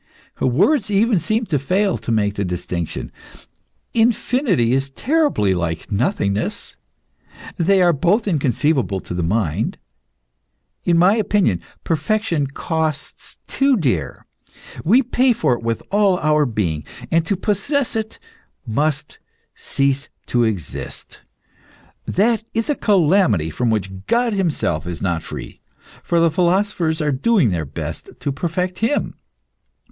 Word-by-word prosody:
Words 195 - +2
even 210 0 +3
seem 215 +7 -1
to 150 -8 0
fail 190 +8 +1
to - - -4
make 105 -2 +1
the 100 - -2
distinction. 90 -2 -4 0.8
Infinity 225 - +2
is 135 +1 0
terribly 275 - +1
like 85 +1 -3
nothingness 100 - -1 0.8
they 185 +2 +3
are 175 -1 +4
both 180 - +1
inconceivable 140 - +1
to 90 - -7
the 90 - -2
mind. 85 -2 -1 1.1
In 170 -1 +3
my 185 +5 +5
opinion 205 - +1 0.2
perfection 165 -1 0
costs 155 +1 -4
too 275 -2 +2
dear; 115 - -1 0.6
we 240 +10 +4
pay 255 +1 +2
for 220 - +1
it 120 - -3
with 115 -1 -2
all 200 -2 +3
our 150 -2 +2
being, 85 -10 -2 0.3
and 165 0 +3
to 200 - +1
possess 225 - 0
it 220 -1 -3 0.5
must 145 +5 -1 0.3
cease 140 0 -1 0.2
to 120 -1 +1
exist. 105 -9 -4 0.9
That 220 +3 +2
is 225 +5 0
a - - 0
calamity 170 - +3
from 120 +6 -1
which 95 -3 -3
God 235 -1 +2
Himself 155 - -1
is 85 -1 -4
not 85 -4 -1
free, - - -9 0.4
for 170 - +1
the 165 -1 +4
philosophers 175 -1 +1
are 150 - +1
doing 145 - +2
their 85 -3 -2
best 70 - -6
to 140 - -2
perfect 180 +5 -2
Him. 230 +6 0
160 Hz, 130 wpm, -20 LUFS, -, 1.1 s, my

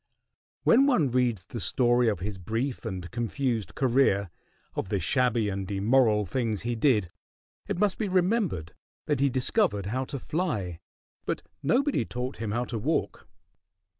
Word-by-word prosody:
When 270 +4 +5
one 165 - +3
reads 120 -6 +1
the 115 +4 -6
story 120 +5 +2
of 105 -6 0
his 100 0 -4
brief 115 +8 -3
and 90 -1 -5
confused 120 - -2
career, 120 -8 +2 0.4
of - - -3
the 100 - 0
shabby 120 -1 +2
and 95 -1 -3
immoral 105 +1 +3
things 110 0 -2
he 120 0 -1
did, 110 - +2 0.6
it - - -2
must 200 0 +1
be 215 - 0
remembered 185 - 0 0.3
that 145 -3 0
he 140 0 +3
discovered 130 - +1
how 130 +6 -2
to 140 - -5
fly, 125 - -2 0.5
but - - -2 0.2
nobody 275 - +2
taught 125 +2 -5
him 110 -2 -4
how 120 +4 -1
to 115 -2 -4
walk. - - -1
120 Hz, 155 wpm, -27 LUFS, 100-140 Hz, 0.6 s, When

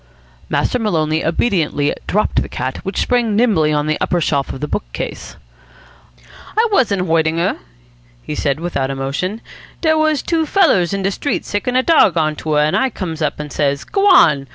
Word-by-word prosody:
Master 250 - 0
Maloney 160 -7 0
obediently 165 -5 0
dropped 210 - +1
the - - -5
cat, 130 +1 -4
which 195 - -4
sprang 240 -4 +1
nimbly 200 -10 +2
on 150 -1 0
to 155 - 0
an 155 - 0
upper 175 - +1
shelf 140 -4 -1
of - - -7
the 150 - -3
book 205 - -4
case. - - -6 1.2
"I 455 +1 +4
wasn't 205 - +2
hoitin' 160 -1 +1
her," 170 - 0 0.6
he - - -5
said, 145 -1 -1
without 150 -6 -2
emotion. 140 +11 -3 0.4
"Dere 315 -1 +2
was 310 -3 +1
two 325 -2 0
fellers 290 - +3
in 195 -1 -2
de 195 - +1
street 285 - -3
sickin' 205 +5 -2
a 255 - +3
dawg 280 - +4
on 155 -1 +1
to 155 - -3
her. 150 - +3
An' 150 +1 +1
I 265 - +2
comes 170 -8 -6
up 150 - -1
an' 150 -1 -6
says, 140 -1 -1
'G'wan! 170 - +4
175 Hz, 190 wpm, -17 LUFS, 150-240 Hz, 1.2 s, I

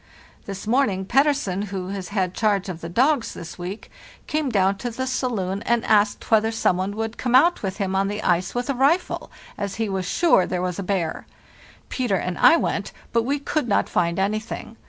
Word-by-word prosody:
This 195 0 -6
morning 215 -5 +1
Pettersen, 265 -6 +1
who 190 -2 -5
has 195 -2 -5
had 190 -3 -1
charge 200 -3 +1
of 170 -2 -6
the 165 - -6
dogs 255 - +1
this 170 +2 -9
week, 185 +5 -7 0.3
came 305 -2 -1
down 195 -3 +2
to 245 - -3
the 260 +3 -3
saloon 220 -7 -2
and 235 0 0
asked 210 0 +2
whether 220 0 +4
some 225 -5 +1
one 190 +3 -2
would 225 +1 -4
come 250 -1 +1
out 335 +7 +5
with 190 -1 -3
him 195 -3 -1
on 195 +1 +2
the 210 +1 -4
ice 175 +3 +1
with 245 0 -1
a 275 - 0
rifle, 285 +8 +1 0.3
as 200 -1 -3
he 225 -1 -1
was 190 -2 -2
sure 320 - +3
there 180 - -2
was 180 0 -2
a - - -1
bear. 180 -4 -2 0.6
Peter 245 -6 0
and 180 -1 -3
I 330 - +7
went, - - -2 0.2
but 230 -1 +2
we 280 +3 0
could 290 -1 -2
not 205 - +2
find 170 -1 0
anything. 215 +3 -3
205 Hz, 205 wpm, -23 LUFS, 190-245 Hz, 0.6 s, I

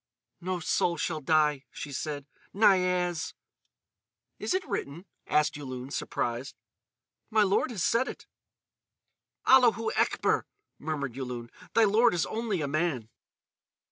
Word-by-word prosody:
"No 185 +1 -2
soul 170 +1 +1
shall 155 0 -2
die," 150 -1 +2
she 145 - -7
said. 145 0 -4 0.3
"Niaz!" 180 -4 +2 1.0
"Is 370 - 0
it 375 - -2
written?" 155 +7 -4 0.2
asked 150 0 +2
Yulun, 130 -2 -6
surprised. 120 +1 -3 0.7
"My 215 -1 +4
lord 200 +5 +2
has 210 -8 -3
said 240 +3 +2
it." - - -8 1.2
"Allahou 235 -4 +5
Ekber," - - +1 0.3
murmured 145 -4 -3
Yulun; 125 -2 -6 0.2
"thy 230 - +6
lord 220 0 +4
is 165 - +1
only 220 -6 -2
a 145 - -1
man." 145 -6 -1
165 Hz, 120 wpm, -29 LUFS, 140-205 Hz, 1.2 s, thy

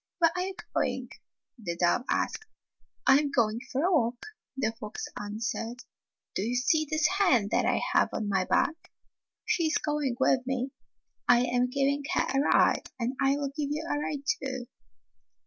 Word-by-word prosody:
"Where 335 -2 +4
are 360 - 0
you 380 +1 -3 0.2
going - - -1 0.5
the 170 -6 -4
dove 175 +8 +2
asked. 440 - -1 0.3
" - - -23
I 270 +1 +7
am 295 -1 -1
going 230 -5 +1
for 270 +3 0
a 365 - +3
walk," 245 - +1 0.3
the 220 -5 +1
fox 215 -2 -5
answered. 225 +3 -4 0.2
" - - -60
Do - - 0
you 235 +5 -1
see 310 +5 +2
this 310 0 +1
hen 250 - +4
that - - +2
I - - +2
have - - +4
on 215 - -3
my 190 -2 +1
back? 320 - 0 0.5
She 335 -2 +1
is 310 - +2
going 295 -4 -1
with 265 0 +4
me. 265 0 -1 0.6
I 240 0 +6
am 250 0 +1
giving 280 +2 +1
her - - +3
a 270 - +3
ride, - - +3
and 245 +3 -1
I 275 +1 +3
will 280 -1 -2
give 295 -2 -2
you 305 +2 -2
a 290 - 0
ride, 290 -1 -3 0.2
too." 260 -2 -4
265 Hz, 185 wpm, -29 LUFS, 235-295 Hz, 0.6 s, I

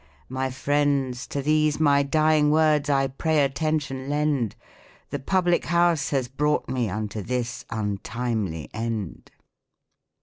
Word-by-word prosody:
My 130 +1 -2
friends, 135 -1 0
to 140 - -3
these 155 0 +2
my 145 -2 +4
dying 155 +1 +3
words 150 -1 +3
I 135 -1 +3
pray 150 +3 +1
attention 140 -2 -1
lend, 145 -6 0 0.3
' - - -28
Th(5 140 -1 -5
public 180 -2 +2
house 170 -3 +2
has 135 -4 0
brought 150 +3 0
me 125 -4 -1
unto 105 +1 -4
this 125 +2 -3
untimely 105 -4 -3
end." 110 -5 -4
140 Hz, 130 wpm, -25 LUFS, 120-150 Hz, 0.3 s, my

